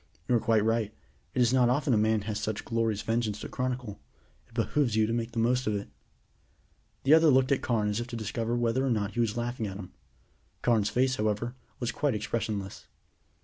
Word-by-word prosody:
"You're 120 -2 +3
quite 110 -1 +2
right, 115 -2 +1 0.4
it 125 - +2
is 120 +1 +2
not 125 -2 +4
often 140 +1 +2
a - - +5
man 110 0 +2
has 105 0 -3
such 110 0 -3
glorious 115 -3 0
vengeance 110 -2 -1
to - - -5
chronicle. 125 -5 -3 0.5
It 115 - -22
behooves 120 +1 +1
you 110 0 +4
to 115 - -1
make 115 0 -2
the - - -7
most 125 +2 +2
of 105 - +1
it." 100 - -4 1.1
The 140 - +5
other 160 0 +7
looked 130 -1 +4
at 140 - +2
Carne 110 -4 +1
as 105 +2 -1
if 120 - -4
to 125 - -6
discover 115 +1 -2
whether 120 +2 +1
or 135 - +1
not 105 -4 0
he 120 - -4
was 115 -1 +1
laughing 120 -2 -2
at 95 -1 -6
him. 95 -6 -9 0.7
Carne's 110 -4 +3
face, 130 +1 +1
however, 110 +3 -1 0.3
was 120 -1 -1
quite 145 -6 0
expressionless. 105 -3 -3
115 Hz, 210 wpm, -29 LUFS, 105-125 Hz, 1.1 s, other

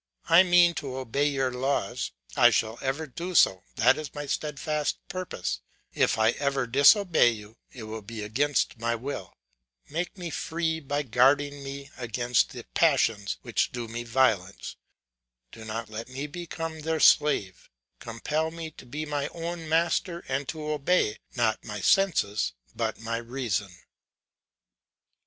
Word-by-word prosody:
I 165 +2 +8
mean 175 -2 +5
to 130 -2 -5
obey 130 +3 0
your 135 -3 -1
laws, 135 +3 -1 0.3
I - - +7
shall 110 +1 0
ever 135 +4 -2
do 170 +6 -6
so, 95 - +4
that 125 +6 +4
is 155 -2 -7
my 145 0 -4
steadfast 150 +1 -2
purpose; 90 - -4 0.3
if - - +2
I 110 +1 +4
ever 140 -2 0
disobey 145 - +5
you, 110 -1 -8
it 120 - -9
will 110 0 -6
be 110 +1 -7
against 125 +3 0
my 115 +1 0
will; 115 -7 -6 0.5
make 175 +5 -3
me 175 -3 -5
free 160 0 -2
by 145 0 -2
guarding 140 +3 +2
me 140 0 -7
against 120 0 +1
the - - -8
passions 100 -3 +2
which - - 0
do 120 -2 -5
me 115 +1 -5
violence; 115 -6 0 0.8
do 110 -1 -11
not 115 +1 -4
let 110 +3 -7
me 135 +3 -5
become 165 0 -6
their 160 +1 -1
slave; 100 -15 +3 0.3
compel 150 +7 -2
me 165 -1 -7
to 125 - -14
be 150 +5 -4
my 145 -2 -2
own 165 -1 -6
master 170 +2 +1
and 135 0 -2
to 155 -1 -4
obey, 150 -6 +1 0.2
not 110 -3 +1
my 105 -2 -6
senses, 105 - +2 0.2
but - - -2
my 115 0 -3
reason." 115 -5 -2
135 Hz, 150 wpm, -27 LUFS, 115-155 Hz, 0.8 s, I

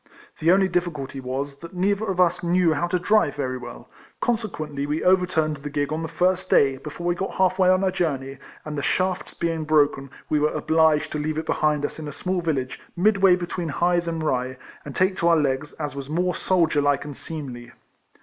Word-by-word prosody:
The 165 +2 +4
only 190 +1 +4
difficulty 165 -7 -2
was, 135 +2 -4
that 170 +3 -10
neither 200 +4 +1
of 190 -2 -2
us 175 -1 +3
knew 175 -1 +3
how 175 +3 -1
to 180 - 0
drive 195 -4 +2
very 130 -3 -3
well, 120 -1 -10 0.3
consequently 155 -12 -2
we 150 +2 -1
overturned 180 -4 +2
the 145 +1 -7
gig 145 +1 -1
on 160 - -2
the 160 - -3
first 185 +2 0
day, 135 -1 +4
before 150 +5 -8
we 175 - +2
got 190 +2 -4
half 185 0 +2
way 185 -1 +5
on 185 +1 +3
our 190 - +2
journey, 140 -7 -2 0.3
and 155 -1 -5
the 145 - -2
shafts 185 +5 -1
being 165 -1 -1
broken 145 -3 +2 0.2
we 150 - +1
were 150 +1 +1
obliged 160 -1 +2
to 150 - -2
leave 155 +1 -2
it 160 - -2
behind 150 -1 +1
us - - -5
in 155 - -6
a - - -5
small 185 +4 -2
village, 135 -6 -2 0.2
midway 195 -1 +5
between 175 -1 -4
Hythe 175 +2 +1
and 165 -1 -2
Rye, 130 -3 -1 0.3
and 140 - -8
take 185 +1 +2
to 170 - +1
our 170 -1 +5
legs, 145 0 -1
as 145 -3 -5
was 140 0 -6
more 180 +3 0
soldierlike 145 -7 +1
and 145 -2 -7
seemly. 130 -7 -7
160 Hz, 210 wpm, -24 LUFS, 145-180 Hz, 0.3 s, way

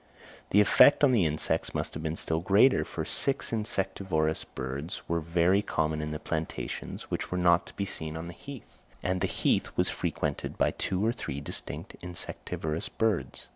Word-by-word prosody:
The 105 - +6
effect 140 +8 +6
on 140 - +7
the 110 -8 +4
insects 75 0 -1
must - - -2
have 80 - -5
been 80 0 -2
still 80 0 -1
greater, 100 +9 +5
for - - -5
six 135 -3 0
insectivorous 95 -7 -1
birds 65 +6 -5
were 85 0 +1
very 85 +4 +3
common 80 -5 -1
in 75 - -3
the 75 - -3
plantations, 80 +1 -4
which - - -2
were 90 - 0
not 85 0 +4
to - - -12
be 100 - -1
seen 80 -4 -4
on 80 - -5
the 85 - -7
heath; 140 +7 -11 0.2
and 90 0 0
the 95 - +2
heath - - +1
was - - +4
frequented - - -2
by - - +3
two 95 +2 -1
or 115 - +3
three 70 - -5
distinct 70 - -5
insectivorous 85 -2 -4
birds. 110 -5 -1
85 Hz, 180 wpm, -29 LUFS, 80-100 Hz, 0.2 s, on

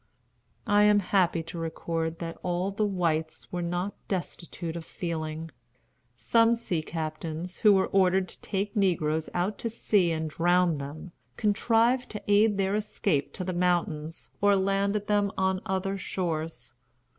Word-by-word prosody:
I 205 -2 +4
am 210 0 +6
happy 180 -4 +2
to 165 +1 -7
record 165 0 -3
that 165 -1 -6
all 180 +2 -1
the 210 +1 0
whites 160 -5 -1
were 180 - -2
not 175 +3 -2
destitute 170 -3 -4
of 170 - -5
feeling. 160 -2 -4 0.7
Some 230 - +4
sea 185 -8 -2
captains, 160 +2 -5
who 210 -2 +6
were 190 -1 +3
ordered 190 -1 +3
to - - -13
take 200 +1 -3
negroes 160 -6 +1
out 185 +4 -1
to 230 - -2
sea 205 -5 +2
and 160 -1 -1
drown 175 0 +2
them, 145 +5 -7 0.3
contrived 230 +4 +2
to 210 - -6
aid 205 0 +4
their 195 0 +1
escape 205 -7 0
to 185 - -4
the 185 0 -3
mountains, 170 -3 -1
or 205 0 +5
landed 195 +2 +1
them 205 -1 +2
on 190 0 +1
other 195 +1 -1
shores. 160 -10 -3
180 Hz, 150 wpm, -28 LUFS, 165-200 Hz, 0.7 s, am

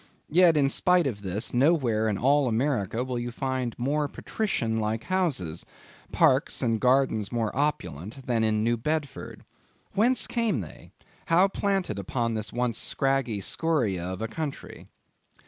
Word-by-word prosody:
Yet, 170 -1 +5
in 140 -2 +4
spite 180 +4 +3
of 110 -7 -3
this, 100 +3 -3
nowhere 120 -6 +2
in 100 - -1
all 140 +4 +3
America 120 -2 0
will 125 -1 -3
you 120 0 -3
find 130 -2 -3
more 145 +4 0
patrician 115 - -2
like 110 +1 -1
houses; 145 - -1 0.5
parks - - +2
and 115 -2 0
gardens 125 -5 +2
more 115 -3 -1
opulent, 130 - -3
than 115 -3 +1
in 110 -1 +1
New 120 +1 +1
Bedford. 150 +3 -4 0.5
Whence 235 +6 +3
came 230 - 0
they? 85 - -11 0.4
how 175 +4 +5
planted 195 - -1
upon 115 +4 -2
this 110 -1 -3
once 120 -2 -1
scraggy 135 -6 0
scoria 115 - 0
of 95 +3 -4
a - - -1
country? 145 +5 -6
125 Hz, 145 wpm, -27 LUFS, 110-150 Hz, 0.5 s, Yet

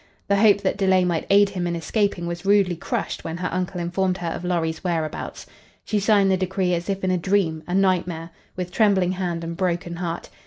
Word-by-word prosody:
The 200 - +4
hope 205 -1 +5
that 190 -1 0
delay 190 -2 +3
might 170 -3 -1
aid 200 0 +5
him 180 -3 -3
in 170 - -1
escaping 195 +1 -1
was 170 0 -5
rudely 195 -2 +3
crushed 165 - -3
when 165 +1 -4
her 180 0 -3
uncle 180 0 -2
informed 180 +2 0
her 175 -2 -3
of 165 - -5
Lorry's 165 -2 -1
whereabouts. 165 -4 -3 0.4
She 210 - 0
signed 200 -1 +3
the 190 - +3
decree 185 -1 0
as 170 +2 -2
if 195 -1 -2
in 185 - +1
a 180 - +1
dream, 175 -4 +1
a 180 - -1
nightmare, 180 -3 +1 0.2
with 180 -1 -4
trembling 195 -3 +3
hand 175 -3 -3
and 165 0 -4
broken 175 -1 -2
heart. 170 -1 -4
180 Hz, 210 wpm, -23 LUFS, 170-195 Hz, 0.4 s, hope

